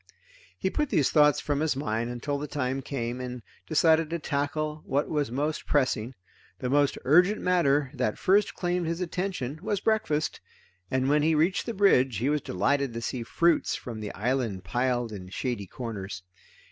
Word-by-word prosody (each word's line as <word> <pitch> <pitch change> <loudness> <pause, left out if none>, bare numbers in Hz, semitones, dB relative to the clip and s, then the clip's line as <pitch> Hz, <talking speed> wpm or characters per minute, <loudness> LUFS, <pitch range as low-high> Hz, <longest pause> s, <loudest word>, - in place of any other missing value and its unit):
He 190 - -1
put 300 -2 0
these 145 -4 +2
thoughts 150 -2 +5
from 145 -1 -1
his 155 -2 +1
mind 115 -3 -2
until 140 +4 -3
the 150 - -4
time 135 -2 -2
came, 125 -2 -4
and 125 -2 -6 0.2
decided 160 0 +3
to 170 - -1
tackle 150 +1 -2
what 140 +2 +1
was 145 -5 -1
most 150 +5 -2
pressing. 130 -4 +1 0.4
The 125 - -3
most 145 0 +3
urgent 180 +9 +5
matter 145 -7 +2
that 125 -6 -1
first 200 +2 +2
claimed 175 -1 -1
his 165 +1 -2
attention 180 -6 -3
was 205 0 -1
breakfast, 195 -9 0 0.5
and 130 0 +1
when 150 +2 +3
he 160 +1 +3
reached 175 +9 +1
the 235 - -3
bridge 135 - +4
he 125 +7 0
was 150 0 +1
delighted 130 +7 0
to 115 - -3
see 125 +1 -3
fruits 170 +8 +2
from 115 -3 -7
the 105 -1 -5
island 115 -4 -1
piled 120 +3 0
in 95 -3 -8
shady 115 -1 -3
corners. 100 -5 -6
140 Hz, 175 wpm, -27 LUFS, 120-160 Hz, 0.5 s, thoughts